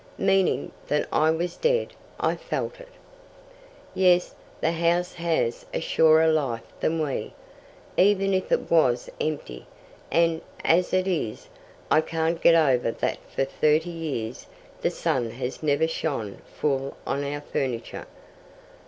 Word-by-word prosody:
"Meaning 195 -1 +2 0.2
that 150 - 0
I 155 - +3
was 170 +2 -1
dead. 480 0 +1 0.3
I - - +1
felt - - -4
it." - - -11 1.1
"Yes, 180 -1 +3 0.3
the 160 - +1
house 170 +2 +1
has 455 - -1
a - - +1
surer 160 - +4
life 140 -8 +1 0.2
than 165 +1 0
we, 140 -3 -3 0.6
even 195 0 +4
if 185 0 -1
it - - 0
was 130 -8 +3
empty, 145 - -4 0.4
and, 165 -1 +2 0.2
as 175 +2 +3
it 185 0 +2
is, 155 - -2 0.4
I 155 - +6
can't 165 +1 -1
get 170 - +6
over 135 -7 +3
that - - -2
for 135 - 0
thirty 155 +4 +1
years 140 -9 -5 0.3
the - - +2
sun 120 -3 -1
has 125 +2 -5
never 155 +1 +2
shone 135 -11 -3
full 135 -2 -2
on 140 - -1
our 145 +1 -3
furniture. 125 -5 -4
160 Hz, 135 wpm, -25 LUFS, 140-175 Hz, 1.1 s, I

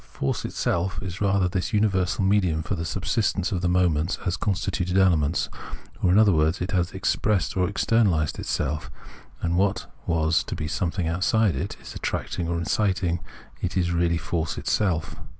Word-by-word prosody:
Force 70 - -3
itself 90 +1 -1
is 95 0 -6
rather 100 -2 +3
this 90 +3 -2
universal 95 -3 +1
medium 95 -5 +2
for - - -3
the 80 - -3
subsistence 95 +1 0
of 90 -3 -1
the 90 - +1
moments 90 -2 +2
as 90 -1 +1
con 95 +2 0
stituent 90 -1 -1
elements; 85 -5 +3 0.5
or, 90 - +3
in 95 - +5
other 105 -2 +6
words, 80 +2 +2
it 90 +1 -3
has 90 -2 +1
expressed 95 +1 0
or 90 -1 +2
externalised 100 -7 +1
itself, 75 +2 -2 0.5
and 85 0 +1
what 100 +1 +1 0.2
was 80 0 +2
to - - -4
be 75 - -3
something 85 +1 -1
outside 95 +3 +2
it 85 +9 -4 0.2
attracting 85 -2 -3
or 85 0 -1
inciting 90 0 0 0.4
it 90 +1 -2
is 90 -1 +1
really 85 -1 +2
force 80 -2 -2
itself. 80 -7 0
90 Hz, 170 wpm, -25 LUFS, 85-95 Hz, 0.5 s, other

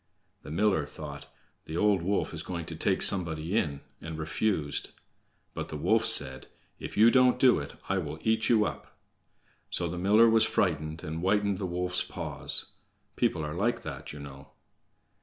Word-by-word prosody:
The - - -11
miller 85 -2 +1
thought, - - -9 0.4
"The 80 - -5
old 105 -2 +3
wolf 95 +2 -1
is 80 - -5
going 85 -2 -5
to 80 - -7
take 95 +4 +1
somebody 85 -1 +1
in," 70 -9 0 0.2
and 80 0 -6
refused. 80 -1 -1 0.6
But - - -5
the 75 - -5
wolf 110 +9 +2
said: 70 -12 +2 0.3
"If - - -7
you 115 +2 +7
don't 125 -1 +4
do 125 -2 +5
it, 70 - -7
I 95 0 +1
will 80 -3 -5
eat 110 0 +1
you 110 -3 +4
up." - - -7 0.7
So 85 - -2
the 85 +1 -5
miller 105 +5 +5
was 115 -1 +5
frightened, 80 -4 -1
and 80 +1 -4
whitened 100 +1 +1
the 95 - -2
wolf's 90 +1 -1
paws. 80 -6 -2 0.5
People 75 - 0
are 75 - -4
like 105 +8 -1
that, - - -7
you 75 - -9
know. 70 -1 -10
90 Hz, 175 wpm, -29 LUFS, 80-105 Hz, 0.7 s, you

